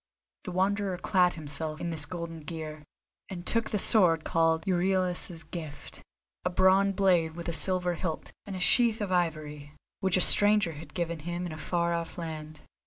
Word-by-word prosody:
The - - -5
Wanderer 190 +1 -1
clad 180 -1 +1
himself 155 0 -6
in 170 - -4
this 155 -3 +6
golden 170 -2 -7
gear, 155 -1 -8 0.5
and 180 -3 -8
took 230 -1 0
the 210 - -1
sword 175 -6 +4
called 165 0 0
"Euryalus's 180 -2 -1
Gift," 160 -2 -9 0.4
a 180 - 0
bronze 190 +2 +3
blade 175 -5 +1
with 170 0 -8
a 170 - -2
silver 180 +1 +3
hilt, 165 -2 -5 0.2
and 195 - -6
a - - -5
sheath 230 +4 +2
of 205 -3 -4
ivory, 155 -4 -3 0.3
which 190 -2 +1
a - - +2
stranger 205 -1 +6
had 150 -1 -12
given 170 -2 -3
him 175 +3 -5
in 175 - -6
a 155 - -8
far 170 +3 -1
off 170 -1 -5
land. 155 -2 -8
175 Hz, 175 wpm, -28 LUFS, 160-185 Hz, 0.5 s, this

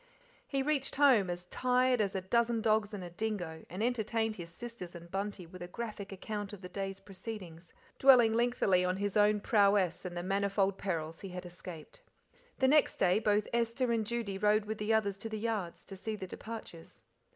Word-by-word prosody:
He 275 -1 0
reached 285 -2 0
home 260 -9 +5
as 175 0 -4
tired 250 +3 +2
as 195 -2 -1
"a 190 - 0
dozen 235 +4 +2
dogs 215 -2 +2
and 205 -3 -5
a 175 - -7
dingo," 175 -5 -4
and 185 +5 -3
entertained 225 -2 0
his 170 -2 -7
sisters 210 -2 -8
and 170 0 -10
Bunty 195 -1 -3
with 180 +2 -12
a 175 - -5
graphic 210 0 -6
account 205 +1 -5
of 200 - -9
the 180 - -7
day's 195 +1 -4
proceedings, 190 -4 -8 0.3
dwelling 245 -4 +7
lengthily 230 -6 +3
on 180 +1 0
his 200 0 -2
own 210 0 +4
prowess 200 -5 +3
and 180 -2 -5
the 175 - -3
manifold 195 0 +1
perils 165 -4 -3
he 195 - -6
had 180 0 -7
escaped. 175 - -9 0.6
The 265 - +3
next 300 +2 +4
day 185 +2 +3
both 210 -1 +2
Esther 235 +1 +1
and 225 -1 +1
Judy 215 -3 -3
rode 210 +1 +3
with 215 0 -4
the 210 +1 0
others 200 -3 +1
to 225 - -5
the 220 - -3
yards 210 -6 -3
to 195 - -9
see 215 +3 -4
the 195 - -6
departures. 190 -4 -8
205 Hz, 195 wpm, -32 LUFS, 185-225 Hz, 0.6 s, dwelling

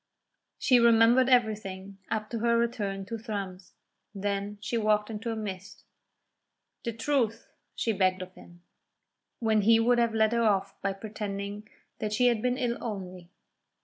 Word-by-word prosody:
She 250 -2 +4
remembered 235 +2 +5
everything 200 -5 0
up 215 -1 -3
to 230 - -2
her 235 +1 +2
return 205 -5 -1
to 230 +2 -5
Thrums; 195 -5 -6 0.4
then 200 +1 -3
she 220 +3 -4
walked 215 -1 +1
into 225 +2 -4
a - - -3
mist. 205 -2 -7 1.0
"The 235 - -2
truth," 230 -1 -1 0.2
she 225 - 0
begged 185 -1 +1
of 185 0 -12
him, 175 -1 -16 0.7
when 220 -2 +2
he 225 +2 +5
would 240 +1 +3
have 230 -1 +1
led 220 0 +3
her 235 - +2
off 200 -3 +1
by 195 0 -1
pretending 205 0 -6 0.3
that 215 -1 -2
she 245 +4 +2
had 230 -3 0
been 250 +1 0
ill 245 -3 -1
only. 185 -5 -6
215 Hz, 155 wpm, -28 LUFS, 195-230 Hz, 1.0 s, remembered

